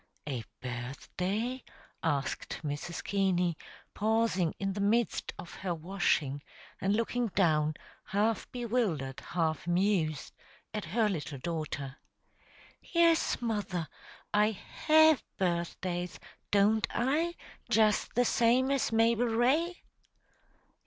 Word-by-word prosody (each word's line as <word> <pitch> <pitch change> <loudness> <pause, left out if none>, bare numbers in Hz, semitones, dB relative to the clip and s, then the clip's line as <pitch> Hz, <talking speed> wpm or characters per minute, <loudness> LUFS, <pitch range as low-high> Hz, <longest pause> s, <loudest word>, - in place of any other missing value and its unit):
"A 130 -5 -3 0.2
birthday?" 180 - -3 0.4
asked 140 -4 -2
Mrs. 145 +3 -4
Keaney, 185 -4 +1 0.4
pausing 220 -6 +1
in 195 -1 -2
the 200 - -3
midst 225 +3 +1
of 170 - -9
her 180 -3 -2
washing, 155 -5 0 0.4
and 195 +2 +1
looking 235 +2 0
down, 155 -6 +2 0.3
half 210 +2 0
bewildered, 215 - -1
half 165 -2 -2
amused, 175 -4 +1 0.4
at 210 -4 -3
her 215 +7 +2
little 150 -7 -3
daughter. 145 -3 -4 0.8
"Yes, 335 -1 +3
mother. 205 -7 -2 0.5
I 210 +1 +5
have 315 +7 +4
birthdays, 175 -1 -2 0.3
don't 210 +2 +3
I, 310 +8 0 0.3
just 215 -1 +3
the 245 +1 +4
same 245 +4 +3
as 275 -4 +1
Mabel 230 +1 +3
Ray?" 275 +10 +1
200 Hz, 105 wpm, -31 LUFS, 165-230 Hz, 0.8 s, I